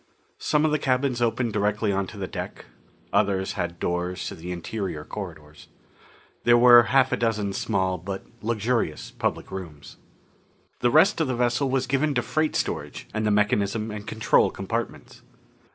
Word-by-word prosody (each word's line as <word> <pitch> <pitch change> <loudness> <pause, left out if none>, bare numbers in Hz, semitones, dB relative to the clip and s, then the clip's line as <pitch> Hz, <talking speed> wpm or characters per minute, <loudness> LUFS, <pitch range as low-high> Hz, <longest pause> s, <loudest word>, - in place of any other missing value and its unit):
Some 150 0 +2
of 155 - +2
the 150 - +1
cabins 130 -2 0
opened 115 -1 0
directly 105 +1 +1
onto 95 -2 -2
the - - -3
deck. - - -7 0.5
Others 100 -2 +1
had 85 -2 -3
doors 90 +1 -2
to - - -4
the 85 +2 -7
interior 90 -3 -4
corridors. 80 -7 -9 0.8
There 120 0 +6
were 120 0 +9
half 130 +2 +3
a - - +3
dozen 105 -4 0
small 95 -3 0
but 95 +3 -6 0.2
luxurious 115 -6 -1
public - - -3
rooms. 85 -7 -8 0.8
The 120 - +3
rest 165 +7 +4
of 160 - +1
the 130 - -1
vessel 120 +3 +1
was 130 0 +1
given 140 +3 0
to - - +1
freight 155 0 0
storage - - -3
and 110 0 -1
the - - +3
mechanism 105 +1 +1
and 105 0 -7
control 110 0 +3
compartments. 115 +5 -5
110 Hz, 160 wpm, -25 LUFS, 95-125 Hz, 0.8 s, were